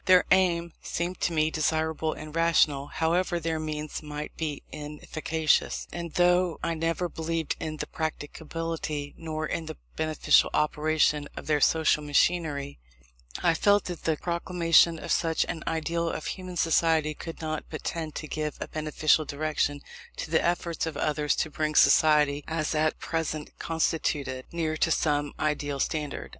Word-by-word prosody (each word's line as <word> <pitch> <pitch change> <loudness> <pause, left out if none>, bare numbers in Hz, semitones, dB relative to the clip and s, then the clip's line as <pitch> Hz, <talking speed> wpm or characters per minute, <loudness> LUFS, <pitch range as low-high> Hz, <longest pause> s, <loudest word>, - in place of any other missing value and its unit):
Their 185 -1 +6
aim 170 -3 +3
seemed 175 +2 -3
to - - +1
me 155 -1 +2
desirable 160 0 0
and 155 0 -9
rational, 155 -4 +3
however 170 +3 0
their 165 -1 -2
means 155 -1 -4
might 150 0 -6
be 155 -3 -4
inefficacious; 155 +1 -1
and 170 -1 -5
though 180 -1 +3
I 165 - 0
neither 165 +2 -1
believed 165 -1 -2
in 155 -1 -4
the - - -3
practicability, 155 -1 -4
nor 155 -1 -4
in 160 +1 -3
the 155 - -6 0.2
beneficial 155 -1 +3
operation 150 -1 +2
of - - -6
their 150 -1 +1
social 160 0 +3
machinery, 145 - +1 0.6
I 170 - +4
felt 205 +4 +3
that 175 -2 -7
the 160 -2 +1
proclamation 170 -1 +3
of - - -5
such 165 -2 +2
an 160 - -5
ideal 165 +1 -1
of 155 - -4
human 185 -2 -5
society 160 -2 +2
could 165 +2 -8
not 155 -1 -3
but 155 - -6
tend 160 -2 -4
to 155 - -5
give 150 0 -3
a - - -4
beneficial 155 0 +2
direction 145 -1 -1 0.3
to - - -6
the - - +3
efforts 170 -1 -1
of 160 - -4
others 150 -1 +1
to 155 - -1
bring 155 0 -1
society, 150 -2 +5
as 160 -1 -1
at 155 0 +1
present 155 -2 -3
constituted, 150 -5 -1
nearer 160 -2 -1
to 165 - +2
some 145 -2 +1
ideal 145 -2 -1
standard. 150 0 -2
155 Hz, 155 wpm, -27 LUFS, 150-165 Hz, 0.6 s, Their